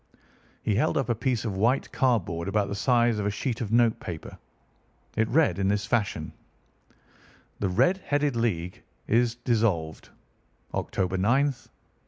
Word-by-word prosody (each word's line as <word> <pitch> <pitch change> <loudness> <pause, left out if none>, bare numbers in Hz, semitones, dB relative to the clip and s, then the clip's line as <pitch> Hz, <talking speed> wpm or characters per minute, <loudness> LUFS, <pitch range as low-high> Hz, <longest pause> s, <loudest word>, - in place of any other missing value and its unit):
He 105 - +1
held 105 - +1
up 135 -2 -1
a - - +3
piece 120 +1 -1
of 105 -4 -2
white 120 +7 +1
cardboard 95 -10 0
about 100 0 0
the - - -3
size 120 -1 +2
of 100 - -2
a - - +2
sheet 115 +4 -3
of 110 -3 -3
note 115 -1 +3
paper. 85 -3 -7 0.8
It 110 0 +2
read 130 - +3
in 95 - +1
this 100 +1 0
fashion: 100 -8 -1 1.3
"THE 100 - 0
RED 130 - +3
HEADED 145 -2 +1
LEAGUE 90 -7 -2 0.3
IS 120 +1 +2
DISSOLVED. 110 -10 -1 0.6
October 95 0 -1
9, 120 +9 +3
1890." 140 -4 -5
110 Hz, 155 wpm, -27 LUFS, 100-120 Hz, 1.3 s, a